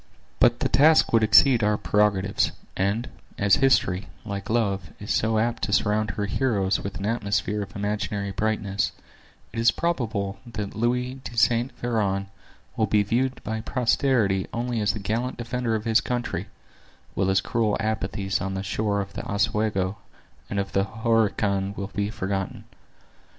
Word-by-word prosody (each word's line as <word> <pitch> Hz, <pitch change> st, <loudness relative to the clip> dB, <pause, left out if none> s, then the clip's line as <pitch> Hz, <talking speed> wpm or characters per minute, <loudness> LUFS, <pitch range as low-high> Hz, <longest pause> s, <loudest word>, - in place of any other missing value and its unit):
But 120 Hz, 0 st, +4 dB
the -, -, +2 dB
task 155 Hz, 0 st, +5 dB
would 115 Hz, -, +5 dB
exceed 110 Hz, +4 st, +6 dB
our 105 Hz, 0 st, +2 dB
prerogatives; 100 Hz, -2 st, +1 dB, 0.2 s
and, 100 Hz, +6 st, 0 dB, 0.3 s
as 100 Hz, -1 st, +4 dB
history, 105 Hz, -8 st, +2 dB, 0.2 s
like 100 Hz, -2 st, -5 dB
love, 100 Hz, -5 st, 0 dB
is 100 Hz, -, -5 dB
so 110 Hz, 0 st, +2 dB
apt 115 Hz, +2 st, 0 dB
to -, -, -1 dB
surround 105 Hz, 0 st, +2 dB
her 100 Hz, +1 st, -2 dB
heroes 100 Hz, -4 st, +1 dB
with 100 Hz, -2 st, -5 dB
an 95 Hz, -, -4 dB
atmosphere 105 Hz, -2 st, 0 dB
of 100 Hz, +2 st, -8 dB
imaginary 100 Hz, -1 st, -2 dB
brightness, 105 Hz, -1 st, -1 dB, 0.6 s
it 115 Hz, -, -3 dB
is 115 Hz, +1 st, +5 dB
probable 110 Hz, -12 st, -1 dB
that 105 Hz, -3 st, -4 dB
Louis 125 Hz, +3 st, -1 dB
de 120 Hz, -, -8 dB
Saint 120 Hz, +3 st, +3 dB
Veran 100 Hz, -5 st, -1 dB, 0.5 s
will 110 Hz, -, +1 dB
be 105 Hz, +1 st, +3 dB
viewed 125 Hz, +5 st, -1 dB
by 110 Hz, +1 st, -3 dB
posterity 115 Hz, -5 st, +1 dB
only 120 Hz, -1 st, -2 dB
as 105 Hz, 0 st, +2 dB
the 110 Hz, -, -5 dB
gallant 115 Hz, +5 st, -2 dB
defender 120 Hz, -1 st, -2 dB
of 110 Hz, 0 st, -3 dB
his 110 Hz, -1 st, +4 dB
country, 125 Hz, 0 st, -3 dB, 0.7 s
while 95 Hz, -, 0 dB
his 95 Hz, 0 st, +3 dB
cruel 115 Hz, -3 st, 0 dB
apathy 100 Hz, -3 st, -2 dB
on 95 Hz, 0 st, -3 dB
the 95 Hz, -, -3 dB
shores 100 Hz, +1 st, 0 dB
of 100 Hz, -, -13 dB
the -, -, -5 dB
Oswego 105 Hz, -2 st, 0 dB, 0.5 s
and 100 Hz, -, -3 dB
of 100 Hz, -, -3 dB
the 95 Hz, 0 st, +1 dB
Horican 105 Hz, -2 st, 0 dB
will 100 Hz, 0 st, -5 dB
be 100 Hz, 0 st, -1 dB
forgotten. 95 Hz, -3 st, -3 dB
105 Hz, 160 wpm, -25 LUFS, 100-115 Hz, 0.7 s, exceed